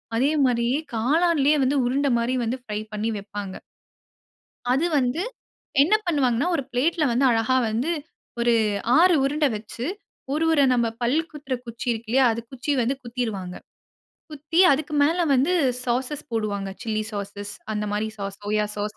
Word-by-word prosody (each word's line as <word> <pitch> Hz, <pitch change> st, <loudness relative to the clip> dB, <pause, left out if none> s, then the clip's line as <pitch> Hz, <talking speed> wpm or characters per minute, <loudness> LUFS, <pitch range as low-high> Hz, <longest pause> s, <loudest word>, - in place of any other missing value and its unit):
அதே 270 Hz, +6 st, +2 dB
மாதிரி 235 Hz, -2 st, +1 dB, 0.3 s
காளானிலேயே 300 Hz, +4 st, +3 dB
வந்து 270 Hz, +3 st, +2 dB
உருண்டை 275 Hz, +3 st, +1 dB
மாதிரி 245 Hz, +2 st, 0 dB
வந்து 245 Hz, +3 st, -2 dB
பிரை 210 Hz, 0 st, -3 dB
பண்ணி 215 Hz, +2 st, -1 dB
வைப்பாங்க. 200 Hz, -1 st, -6 dB, 1.2 s
அது 295 Hz, +6 st, +2 dB
வந்து 255 Hz, +7 st, 0 dB, 0.6 s
என்ன 345 Hz, +9 st, +3 dB
பண்ணுவாங்கன்னா, 280 Hz, -3 st, +1 dB
ஒரு 280 Hz, -, -1 dB
பிளேட்ல 305 Hz, +6 st, +1 dB
வந்து 260 Hz, +3 st, +2 dB
அழகா 230 Hz, +3 st, +2 dB
வந்து, 245 Hz, +10 st, -1 dB, 0.5 s
ஒரு 235 Hz, 0 st, +3 dB, 0.4 s
6 350 Hz, 0 st, +6 dB
உருண்ட 295 Hz, +2 st, +1 dB
வைத்து 220 Hz, +3 st, -6 dB, 0.5 s
ஒரு 315 Hz, +2 st, 0 dB
உர 295 Hz, -3 st, +4 dB
நம்ப 235 Hz, -2 st, +2 dB
பல் 245 Hz, +6 st, +2 dB
குத்துற 285 Hz, -4 st, -6 dB
குச்சி 235 Hz, +2 st, -7 dB
இருக்கில்லயா 230 Hz, +4 st, +1 dB
அது 230 Hz, +1 st, -3 dB
குச்சி 265 Hz, +3 st, -3 dB
வந்து 255 Hz, +4 st, 0 dB
குத்திருவாங்க. 220 Hz, -7 st, -4 dB, 0.8 s
குத்தி, 300 Hz, +4 st, 0 dB
அதுக்கு 300 Hz, +2 st, -2 dB
மேல 335 Hz, +4 st, +2 dB
வந்து 275 Hz, +8 st, +2 dB, 0.3 s
சாஸஸ் 255 Hz, +4 st, -1 dB
போடுவாங்க. 205 Hz, -3 st, -2 dB
சில்லி 215 Hz, -1 st, -1 dB
சாஸ் 205 Hz, 0 st, -5 dB, 0.2 s
அந்த 210 Hz, 0 st, -2 dB
மாதிரி 210 Hz, +1 st, -1 dB
சாஸ், 195 Hz, 0 st, -5 dB
சோயா 210 Hz, +1 st, 0 dB
சாஸ். 210 Hz, +1 st, -3 dB
245 Hz, 150 wpm, -24 LUFS, 220-290 Hz, 1.2 s, 6